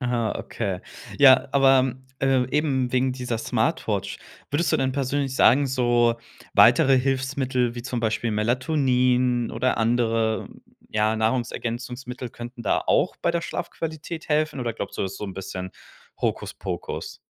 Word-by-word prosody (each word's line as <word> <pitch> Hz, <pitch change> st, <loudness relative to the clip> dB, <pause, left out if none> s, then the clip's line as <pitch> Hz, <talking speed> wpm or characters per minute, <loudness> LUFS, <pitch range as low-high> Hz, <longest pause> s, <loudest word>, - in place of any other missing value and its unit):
Aha, 120 Hz, -4 st, -1 dB
okay. 95 Hz, -5 st, -4 dB, 0.4 s
Ja, 135 Hz, 0 st, +7 dB
aber, 135 Hz, -2 st, +4 dB, 0.3 s
äh, 135 Hz, -2 st, +2 dB
eben 135 Hz, -5 st, +1 dB
wegen 130 Hz, 0 st, +2 dB
dieser 125 Hz, -3 st, -3 dB
Smartwatch, -, -, -1 dB, 0.3 s
würdest 160 Hz, +3 st, +1 dB
du -, -, +4 dB
denn 130 Hz, -1 st, 0 dB
persönlich 135 Hz, 0 st, -1 dB
sagen, 135 Hz, +3 st, +5 dB
so 120 Hz, -2 st, +2 dB, 0.4 s
weitere 135 Hz, -1 st, +6 dB
Hilfsmittel, 130 Hz, -2 st, 0 dB
wie 120 Hz, -, -6 dB
zum 125 Hz, -1 st, -3 dB
Beispiel 115 Hz, 0 st, -1 dB
Melatonin 125 Hz, +1 st, +1 dB
oder 125 Hz, +2 st, 0 dB
andere, 115 Hz, -1 st, +1 dB, 0.4 s
ja, 110 Hz, +1 st, +1 dB
Nahrungsergänzungsmittel 120 Hz, +2 st, -3 dB
könnten 120 Hz, +1 st, -9 dB
da -, -, +1 dB
auch -, -, +2 dB
bei 170 Hz, -, 0 dB
der 170 Hz, 0 st, -1 dB
Schlafqualität 160 Hz, 0 st, -5 dB
helfen, 150 Hz, -3 st, 0 dB
oder 115 Hz, -2 st, -2 dB
glaubst 100 Hz, -, -6 dB
du, -, -, 0 dB
das 95 Hz, 0 st, -4 dB
so -, -, -6 dB
'n 95 Hz, -, -6 dB
bisschen 95 Hz, -1 st, -6 dB, 0.5 s
Hokuspokus? -, -, -4 dB
125 Hz, 140 wpm, -24 LUFS, 115-135 Hz, 0.5 s, Ja